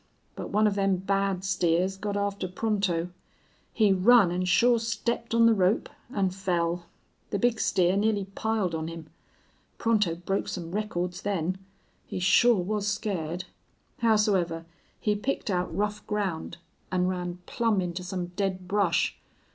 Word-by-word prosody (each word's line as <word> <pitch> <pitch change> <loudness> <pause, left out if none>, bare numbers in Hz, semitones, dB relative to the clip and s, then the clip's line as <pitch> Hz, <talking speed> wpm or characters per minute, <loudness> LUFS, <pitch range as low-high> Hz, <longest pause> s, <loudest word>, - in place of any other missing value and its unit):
But - - -6
one 210 +2 +3
of 210 - +3
them 195 -1 +2
bad 195 0 0
steers 185 0 +1
got 205 +1 -3
after 200 -2 -1
Pronto. 185 -3 -1 0.6
He 210 -3 +3
run 195 0 +5
an' 180 +1 -1
sure 235 +6 +4
stepped 230 +1 -2
on 230 0 +6
the 230 - +6
rope, 195 +1 +2 0.2
an' 195 -6 +1
fell. 175 -2 -1 0.4
The - - -1
big 230 +2 +1
steer 185 -1 +2
nearly 205 -1 +1
piled 200 -2 -1
on 160 0 -2
him. 165 -2 -8 0.7
Pronto 210 -7 +2
broke 185 +3 -2
some 170 -2 -5
records 180 -3 -2
then. 185 -2 -1 0.5
He - - -5
shore 190 +3 +4
was 210 +2 -2
scared. 180 -4 -2 0.6
Howsoever 200 -7 +2 0.3
he 210 - +1
picked 215 0 -2
out 180 -2 -1
rough 210 +1 -2
ground 195 -5 -2 0.3
an' 180 -1 +1
run 180 -1 -2
plumb 230 -4 +1
into 180 0 -3
some 180 -1 -4
dead 190 -2 -2
brush. 195 -3 +1
195 Hz, 145 wpm, -27 LUFS, 180-210 Hz, 0.7 s, on